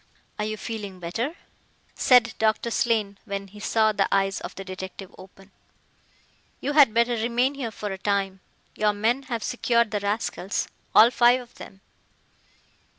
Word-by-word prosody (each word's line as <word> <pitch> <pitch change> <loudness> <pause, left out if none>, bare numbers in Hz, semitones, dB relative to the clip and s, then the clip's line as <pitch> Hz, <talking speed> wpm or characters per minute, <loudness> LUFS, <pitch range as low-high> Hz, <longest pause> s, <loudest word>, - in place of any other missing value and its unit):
"Are 210 - 0
you 215 0 -3
feeling 205 -4 -6
better?" 225 - -3 0.6
said 245 -3 +4
Doctor 220 +1 +1
Slane, 215 -4 0
when 200 -2 -5
he 210 +2 -13
saw 220 +1 +2
the 200 -2 +1
eyes 195 0 +1
of - - -7
the 195 - -8
detective 190 0 -8
open. 190 +1 -16 1.1
"You 285 - -2
had 285 -6 +7
better 235 +2 +2
remain 240 +4 +1
here 270 -5 -4
for 210 -1 -6
a 190 - -6
time. 195 -1 -1 0.3
Your 210 -1 +1
men 225 +6 0
have 235 -3 -3
secured 235 -2 +1
the 210 - -1
rascals 205 -1 -2 0.3
all 230 +3 +8
five 240 +1 +4
of 245 -1 -13
them." 195 0 -12
215 Hz, 155 wpm, -25 LUFS, 195-235 Hz, 1.1 s, all